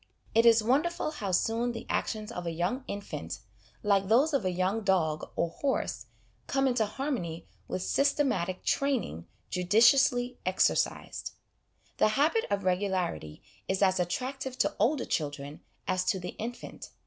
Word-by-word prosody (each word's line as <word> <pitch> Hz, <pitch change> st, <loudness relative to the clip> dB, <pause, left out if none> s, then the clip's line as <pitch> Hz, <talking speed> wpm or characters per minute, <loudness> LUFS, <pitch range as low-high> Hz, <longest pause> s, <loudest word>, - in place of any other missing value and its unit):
It 230 Hz, +1 st, +5 dB
is 225 Hz, -1 st, +6 dB
wonderful 300 Hz, +7 st, +1 dB
how 205 Hz, -11 st, -4 dB
soon 230 Hz, +6 st, +1 dB
the 230 Hz, -, -7 dB
actions 215 Hz, 0 st, -2 dB
of 180 Hz, -6 st, -5 dB
a -, -, -1 dB
young 180 Hz, +11 st, -1 dB
infant 95 Hz, -, -5 dB, 0.5 s
(like 200 Hz, -2 st, +3 dB
those 265 Hz, +9 st, +4 dB
of 275 Hz, -, +2 dB
a 185 Hz, -, +1 dB
young 185 Hz, +5 st, 0 dB
dog 175 Hz, -6 st, +1 dB
or 170 Hz, -, 0 dB
horse) 275 Hz, +8 st, -2 dB, 0.4 s
come 270 Hz, 0 st, +2 dB
into 245 Hz, -4 st, +1 dB
harmony 210 Hz, -, -3 dB, 0.2 s
with 185 Hz, -, -3 dB
systematic 245 Hz, -11 st, +1 dB
' -, -, -27 dB
training 250 Hz, -, -2 dB
' -, -, -41 dB
judiciously 245 Hz, +6 st, +4 dB
exer 185 Hz, +1 st, +3 dB
cised." -, -, -2 dB, 0.6 s
The -, -, +4 dB
habit 320 Hz, +11 st, +3 dB
of 200 Hz, 0 st, 0 dB
regularity 180 Hz, -, -1 dB, 0.2 s
is 190 Hz, +1 st, +1 dB
as 190 Hz, -1 st, +3 dB
attractive 255 Hz, +9 st, -3 dB
to -, -, +1 dB
older 250 Hz, +6 st, +2 dB
children 145 Hz, -1 st, -3 dB, 0.3 s
as 185 Hz, 0 st, +1 dB
to 190 Hz, -, +1 dB
the 180 Hz, -, -5 dB
infant. 240 Hz, +2 st, -7 dB
205 Hz, 155 wpm, -29 LUFS, 180-255 Hz, 0.6 s, is